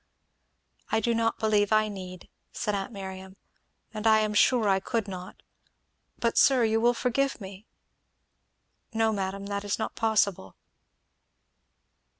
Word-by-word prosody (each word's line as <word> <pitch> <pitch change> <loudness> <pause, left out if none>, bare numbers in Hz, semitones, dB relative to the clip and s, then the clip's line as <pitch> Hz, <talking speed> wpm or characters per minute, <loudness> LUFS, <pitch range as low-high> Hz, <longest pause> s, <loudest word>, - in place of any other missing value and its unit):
"I 220 - +3
do 235 +2 0
not 225 0 0
believe 210 -2 +1
I 215 0 +4
need," 185 -3 -8 0.2
said 210 - -2
aunt 195 +1 -3
Miriam, 190 -2 -8 0.6
"and 215 +1 -2
I 220 0 +5
am 215 -1 -1
sure 225 +1 +3
I 195 -1 +3
could 220 +2 -2
not, 185 -1 -9 0.7
but 235 -1 +1
sir, 260 -3 +5
you 225 0 +2
will 240 +1 +3
forgive 270 +3 0
me?" 195 +1 -10 1.3
"No 225 0 +2
madam 195 0 -3
that 200 0 -3
is 205 0 -1
not 220 - -3
possible." 205 - 0
210 Hz, 140 wpm, -27 LUFS, 195-225 Hz, 1.3 s, I